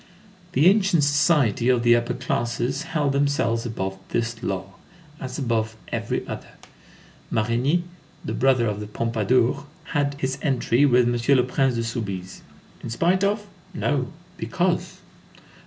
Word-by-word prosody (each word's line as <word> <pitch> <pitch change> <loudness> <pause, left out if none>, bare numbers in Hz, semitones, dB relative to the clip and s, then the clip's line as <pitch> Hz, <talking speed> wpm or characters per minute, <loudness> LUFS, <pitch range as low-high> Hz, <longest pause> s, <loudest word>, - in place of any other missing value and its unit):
The 150 - +3
ancient 190 -5 +4
society 145 - +3
of 125 -2 +3
the 120 0 +6
upper 120 +1 0
classes 125 +1 -1 0.2
held 145 -2 +1
themselves 140 -5 +1
above 95 -4 -4
this 115 0 -2
law, 95 0 -3 0.5
as 130 0 -5
above 110 -5 -1
every - - -2
other. - - -7 0.8
Marigny, 120 +10 +1 0.4
the - - -3
brother 130 -2 +3
of 105 -2 -2
the 105 - -6
Pompadour, 115 +5 +1 0.3
had 145 -2 +1
his 135 0 -2
entry 135 -1 +2
with 125 -2 +4
M. 120 +3 +3
le 125 - +4
Prince 130 0 +1
de 115 - -1
Soubise. 100 -6 -5 0.4
In - - -6
spite 175 - +1
of? 205 +1 +1 0.3
No, - - 0 0.3
because. - - -1
125 Hz, 140 wpm, -24 LUFS, 115-140 Hz, 0.8 s, the